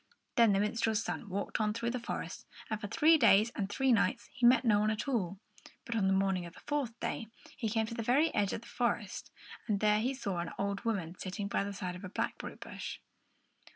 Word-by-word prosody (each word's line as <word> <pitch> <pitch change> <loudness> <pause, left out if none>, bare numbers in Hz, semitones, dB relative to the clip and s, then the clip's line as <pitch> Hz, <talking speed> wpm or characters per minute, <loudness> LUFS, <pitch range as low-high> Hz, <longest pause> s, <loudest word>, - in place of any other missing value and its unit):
Then 230 -3 +6
the 195 - +3
minstrel's 220 +1 +1
son 210 - -4
walked 200 +3 -2
on 210 0 +1
through 235 0 -1
the 250 - -2
forest; 235 - -5 0.2
and 215 -1 -2
for 205 - -3
three 320 +7 +5
days 220 -2 +6
and 200 -2 -2
three 265 +4 +2
nights 235 +2 +1
he 245 -1 +4
met 250 +1 +5
no 210 -3 +5
one 215 +1 +2
at 215 +5 -2
all, 200 -8 -1 0.5
but 235 -3 -3
on 200 -4 +2
the - - +3
morning 190 -1 +1
of 170 - -13
the - - -12
fourth 275 -6 -2
day 225 - -3 0.3
he 230 -5 -2
came 220 +1 +1
to 230 - -6
the 230 - -3
very 275 +8 +3
edge 200 -2 +1
of - - -3
the - - -14
forest, 235 -4 -2 0.4
and 205 -3 +1
there 210 0 +4
he 255 +5 0
saw 200 -9 -3
an 170 -1 -4
old 200 +2 -2
woman 190 -7 -1
sitting 200 +2 -4
by 200 - 0
the 200 - -4
side 185 -2 -4
of 180 - -10
a 185 - -5
blackberry - - -3
bush. - - -7
215 Hz, 235 wpm, -32 LUFS, 200-235 Hz, 0.5 s, Then